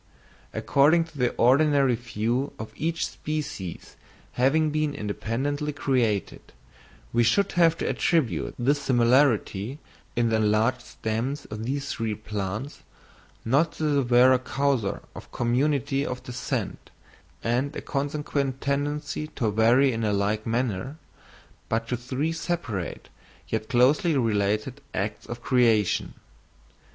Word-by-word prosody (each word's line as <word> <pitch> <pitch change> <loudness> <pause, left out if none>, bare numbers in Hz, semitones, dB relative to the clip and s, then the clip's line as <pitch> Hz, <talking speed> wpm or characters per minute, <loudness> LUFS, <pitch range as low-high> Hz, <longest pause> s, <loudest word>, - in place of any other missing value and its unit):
According 155 +5 +3
to 165 -2 -14
the 125 -1 +3
ordinary 140 +1 +4
view 120 +3 -2
of 110 - -7
each 165 +1 -1
species 145 - -5 0.3
having 150 +5 +2
been 155 -1 0
independently 135 +7 -2
created, 120 -8 0 0.7
we 120 - +3
should 190 - +3
have 165 -2 +4
to - - -2
attribute 160 -9 0
this 140 +4 +1
similarity 120 -2 +2 0.4
in 120 -1 +2
the 110 - +2
enlarged 110 +4 +2
stems 120 +6 -3
of 110 +1 -5
these 140 +2 -2
three 110 -2 -2
plants, 105 +5 -5 0.6
not 140 +8 +2
to - - -6
the 145 -2 +2
vera 125 +1 +5
causa 130 -5 -1
of - - -11
community 135 +3 +1
of 125 -2 -4
descent, 125 -1 -4 0.5
and 125 +5 0
a - - -4
consequent 140 -1 -2
tendency 145 +2 -2
to 115 -7 -2
vary 120 +6 +4
in 115 0 -2
a 105 - +1
like 105 +2 0
manner, 120 +3 -1 0.7
but 115 0 -1
to 125 - +1
three 130 +6 -2
separate 130 - -4 0.4
yet 110 -1 -2
closely 140 +5 +3
related 110 +3 0
acts 100 +2 -3
of 120 0 -7
creation. 115 -6 +2
125 Hz, 125 wpm, -26 LUFS, 115-145 Hz, 0.7 s, vera